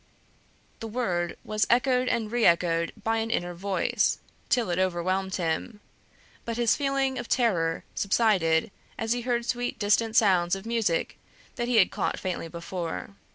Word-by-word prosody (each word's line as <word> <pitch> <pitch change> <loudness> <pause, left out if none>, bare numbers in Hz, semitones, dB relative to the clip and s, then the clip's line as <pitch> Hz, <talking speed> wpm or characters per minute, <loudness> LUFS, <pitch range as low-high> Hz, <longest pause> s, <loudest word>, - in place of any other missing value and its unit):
The 225 - -5
word 185 -7 -2
was 215 0 0
echoed 250 +1 +3
and 225 -3 -1
reëchoed 170 -7 +3
by 225 +1 +1
an 225 0 -1
inner 175 -6 -1
voice, 190 +2 0 0.3
till 235 -7 +2
it 175 - 0
overwhelmed 185 +1 0
him; 180 +5 -2 0.6
but 230 0 -4
his 235 -2 +3
feeling 275 -2 0
of 240 - -6
terror 175 -10 +1
subsided 195 -6 +2 0.3
as 225 0 -2
he 245 - -3
heard 240 -1 -1
sweet 245 0 -2
distant 220 +2 +1
sounds 185 -6 +4
of 195 +2 -8
music 225 -8 -1 0.4
that 240 - -2
he 245 - +1
had 195 - +5
caught 195 - -1
faintly 180 -3 -3
before. 170 +2 -5
210 Hz, 155 wpm, -27 LUFS, 175-235 Hz, 0.6 s, had